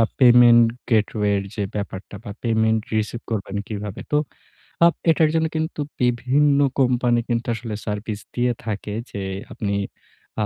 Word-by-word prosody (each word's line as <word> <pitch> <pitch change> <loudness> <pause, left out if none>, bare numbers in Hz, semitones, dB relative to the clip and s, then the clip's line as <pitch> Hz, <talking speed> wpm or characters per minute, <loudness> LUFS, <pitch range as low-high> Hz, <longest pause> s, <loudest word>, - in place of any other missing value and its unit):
আ - - +6 0.2
payment 120 -2 +7 0.2
gateway 105 -1 +2
র - - -9
যে, 105 - -2
ব্যাপারটা 100 0 -5
বা 105 - -6
পেমেন্ট 110 -1 +2 0.2
রিসিভ 110 +2 -2
করবেন 100 -2 -3
কিভাবে? 105 -2 -5
তো - - +4 0.7
আব 170 - +5 0.2
এটার 160 -1 +3
জন্য 160 0 +2
কিন্তু 160 -1 -2 0.2
বিভিন্ন 130 +4 +2 0.2
কোম্পানি 125 -2 +3
কিন্তু 120 0 -1
আসলে 115 -1 -5
সার্ভিস 105 0 -4 0.2
দিয়ে 125 0 +2
থাকে। 105 -1 -4 0.2
যে, 100 - -5 0.3
আপনি 100 -2 -3 0.7
আ - - 0
115 Hz, 150 wpm, -22 LUFS, 105-125 Hz, 0.7 s, পেমেন্ট